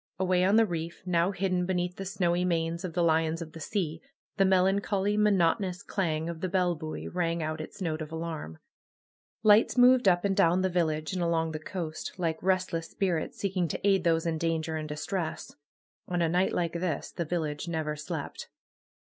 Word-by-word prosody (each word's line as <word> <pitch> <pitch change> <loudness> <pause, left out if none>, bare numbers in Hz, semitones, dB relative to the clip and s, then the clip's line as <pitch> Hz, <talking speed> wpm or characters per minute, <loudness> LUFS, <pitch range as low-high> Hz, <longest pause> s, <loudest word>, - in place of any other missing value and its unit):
Away 185 -1 +2
on 195 +3 +4
the 225 0 +6
reef, 170 -3 -5
now 175 0 +2
hidden 185 -2 0
beneath 180 -1 -1
the 195 - -5
snowy 180 -2 0
manes 170 0 -1
of 180 -3 -4
the 175 0 +1
lions 160 0 +2
of 165 -2 -7
the 165 - -9
sea, 165 -2 -2 0.4
the 195 - +4
melancholy, 195 +2 +2
monotonous 190 -2 +2
clang 160 -5 -1
of 170 -1 -5
the 185 - -1
bell 180 -1 +2
buoy 155 -1 -6
rang 170 -2 -1
out 155 0 -3
its 190 +5 -7
note 155 -2 -2
of 155 0 -6
alarm. 160 - -5 0.9
Lights 215 +3 +5
moved 250 -2 +6
up 175 0 +4
and 195 -1 +1
down 175 +2 +3
the 190 - +2
village, 160 -2 0
and 185 - -2
along 165 -1 +1
the 155 - -4
coast, 160 -1 -5
like 165 -3 -1
restless 185 -3 0
spirits 180 -5 -1
seeking 185 -3 0
to 180 - -2
aid 195 -3 +3
those 165 -1 +2
in 160 -1 -1
danger 160 -1 -1
and 155 -1 -4
distress. 160 +3 -4 0.5
On 175 -1 -1
a 170 - +3
night 180 +3 +2
like 170 -2 -1
this 170 -3 -2
the 170 - -3
village 155 -2 -3
never 160 -2 -2
slept. 155 0 -6
175 Hz, 190 wpm, -29 LUFS, 160-190 Hz, 0.9 s, the